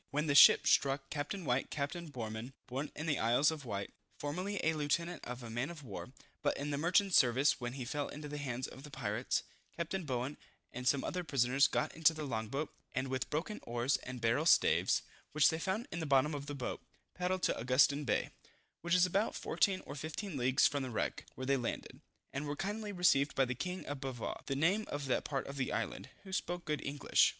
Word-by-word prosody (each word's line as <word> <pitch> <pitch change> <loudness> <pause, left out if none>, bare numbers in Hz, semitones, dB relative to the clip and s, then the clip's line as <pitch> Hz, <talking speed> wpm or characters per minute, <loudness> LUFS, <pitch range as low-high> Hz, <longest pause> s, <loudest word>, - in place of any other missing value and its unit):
When 150 +2 0
the 145 - +2
ship 140 - +9
struck, 135 0 +2
Capt. 145 +5 -2
White, 135 -9 -1
Capt. 145 +1 -2
Boreman, 125 -8 -6
(born 135 +3 -4
in 150 - -4
the 150 -4 +1
Isle 120 +5 +3
of 155 -4 -6
Wight, 100 -3 -4 0.2
formerly 185 +7 -3
a 160 - +3
lieutenant 160 +3 -1
of 125 0 -6
a 115 - -7
man 120 +6 -1
of 165 -4 -9
war, 120 +1 -7 0.3
but 145 - +1
in 145 +1 -3
the 140 - -1
merchant 180 +4 +3
service 130 +2 +4
when 120 0 -3
he 130 -2 -5
fell 145 +3 -2
into 150 0 -7
the 150 0 -5
hands 130 -3 -3
of 130 - -11
the 150 - -10
pirates,) 120 -3 -1 0.3
Capt. 170 0 -3
Bowen 130 +2 -2 0.4
and 125 +1 -4
some 140 0 +3
other 180 0 -2
prisoners 135 -2 +3
got 120 - -1
into 165 0 +4
the 155 - -4
long 110 -6 -2
boat, 140 +7 -3 0.2
and 130 +1 -1
with 130 0 -2
broken 170 +8 -2
oars 120 +3 0
and 130 -1 -7
barrel 115 +8 +2
staves, - - +4 0.3
which 150 -1 +6
they 160 - -2
found 200 +8 -2
in 175 - -3
the 160 - -3
bottom 140 +2 +3
of 145 -1 -5
the 145 - -4
boat, 130 -3 -4 0.3
paddled 180 0 -1
to - - +2
Augustin 130 +4 +4
Bay, 120 - 0 0.5
which 175 +1 +2
is 180 0 +6
about 195 +4 0
14 195 -3 +1
or - - -7
15 155 +5 -5
leagues 130 +1 +3
from 145 -1 +2
the 130 - -3
wreck, 110 - -2
where 130 - -5
they 140 +1 +3
landed, 120 -2 -4 0.3
and 140 +2 -3
were 145 - -2
kindly 210 +4 -3
received 165 -7 +3
by 135 - +4
the 125 - -2
king 180 +8 -4
of 145 -1 -4
Bavaw, 130 -4 -4
(the 135 - -1
name 185 +9 +2
of 145 -1 -4
that 130 - +1
part 140 -2 -2
of 140 - -7
the 130 - -1
island) - - -3
who 190 -1 -9
spoke 175 -1 -2
good 150 -1 -2
English. 140 0 +3
145 Hz, 220 wpm, -34 LUFS, 130-160 Hz, 0.5 s, ship